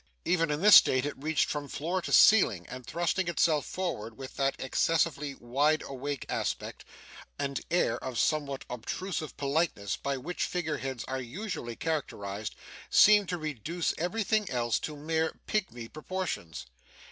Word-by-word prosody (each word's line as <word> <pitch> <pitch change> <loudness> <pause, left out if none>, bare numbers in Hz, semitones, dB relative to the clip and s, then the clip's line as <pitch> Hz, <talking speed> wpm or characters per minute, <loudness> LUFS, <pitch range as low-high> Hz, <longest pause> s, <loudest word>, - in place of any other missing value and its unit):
Even 165 -3 +2
in 150 +4 -1
this 210 0 +11
state 130 +1 +4
it 145 - -2
reached 155 +2 0
from 145 -1 -3
floor 170 +7 -2
to - - -5
ceiling; 115 - +6
and 125 -1 -9
thrusting 175 +2 0
itself 160 -3 +2
forward, 115 - -4
with 135 0 -8
that 135 0 +1
excessively 150 0 0
wide 145 +6 +1
awake 140 +1 -4
aspect, - - -3 0.5
and 140 -1 -2
air 175 - +1
of 130 -2 -4
somewhat 145 -2 0
obtrusive 155 - -4
politeness, 140 - 0
by 140 -1 -2
which 175 +8 -3
figure 160 -4 -2
heads 130 -3 -4
are 130 0 -4
usually 130 - -5
characterised, 105 -10 -3 0.3
seemed 210 -2 +6
to 175 - -1
reduce 155 +2 -2
everything 210 +4 0
else 120 -2 0
to 150 -1 -5
mere 160 +2 -1
pigmy 125 - -2
proportions. 150 - -5
150 Hz, 145 wpm, -29 LUFS, 130-175 Hz, 0.5 s, this